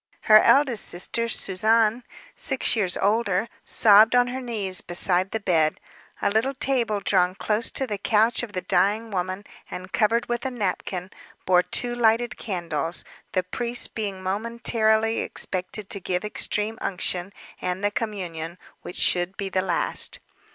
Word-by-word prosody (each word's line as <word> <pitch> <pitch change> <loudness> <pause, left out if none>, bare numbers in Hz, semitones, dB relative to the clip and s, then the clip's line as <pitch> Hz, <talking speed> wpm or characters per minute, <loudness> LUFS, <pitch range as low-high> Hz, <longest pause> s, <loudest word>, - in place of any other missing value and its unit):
Her 215 0 +7
eldest 265 -6 +3
sister, 230 +6 -2
Suzanne, 220 +4 +2 0.3
six 265 -3 +1
years 190 -5 0
older, 205 0 +1 0.2
sobbed 215 +2 +5
on 245 0 +4
her 260 +1 -4
knees 205 -7 0
beside 180 +1 +1
the 220 - -3
bed. 160 -6 +1 0.4
A - - +2
little 240 +6 0
table 240 -6 0
drawn 185 -2 +2
close 215 +3 -1
to 265 - -1
the 210 -5 -4
couch 220 +3 +2
of 240 -4 -7
the 185 - -3
dying 205 +5 +1
woman, 185 +1 -3 0.3
and 185 +1 -8
covered 230 +1 +2
with 240 0 -2
a 265 - -1
napkin, 190 -5 -3 0.3
bore 180 -1 +5
two 240 +6 +1
lighted 230 -1 +2
candles, 170 -5 -3 0.3
the 185 - +1
priest 240 +6 -3
being 200 -4 -4
momentarily 220 +2 +1
expected 185 +2 -3
to 200 - 0
give 180 +1 -2
extreme 210 +1 -2
unction 180 0 -3 0.3
and 180 +2 -3
the 205 - +2
communion, 180 -7 -5 0.2
which 180 - -7
should 180 +2 +1
be 195 -1 -3
the 185 0 0
last. 180 -2 -1
205 Hz, 150 wpm, -24 LUFS, 185-230 Hz, 0.4 s, Her